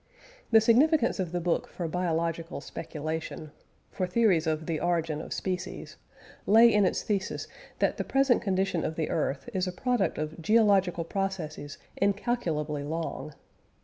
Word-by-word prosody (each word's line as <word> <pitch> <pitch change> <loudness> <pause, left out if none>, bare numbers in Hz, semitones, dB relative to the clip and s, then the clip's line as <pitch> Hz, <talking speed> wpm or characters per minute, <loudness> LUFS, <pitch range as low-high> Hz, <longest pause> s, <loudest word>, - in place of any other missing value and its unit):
The 220 -1 +6
significance 245 +2 +4
of 180 -3 -2
the 175 - -1
book 170 0 0
for 175 - -5
biological 165 -1 -2
speculation 155 0 -5 0.4
for 185 - -2
theories 180 -5 +2
of 155 0 -1
the 160 -2 -2
origin 165 -3 0
of - - -9
species 185 0 -4 0.5
lay 225 +2 +7
in 210 -2 +4
its 180 - 0
thesis 200 -2 -2 0.3
that - - +1
the - - -1
present 270 -3 +2
condition 190 -3 0
of 160 - -2
the 160 -1 -2
earth 150 - -1
is 185 -1 0
the 180 - -2
product 240 +3 0
of 155 +2 -4
geological 195 -4 +3
processes 165 -6 -4 0.2
incalculably 195 - 0
long. 155 -1 -4
180 Hz, 145 wpm, -28 LUFS, 160-205 Hz, 0.5 s, lay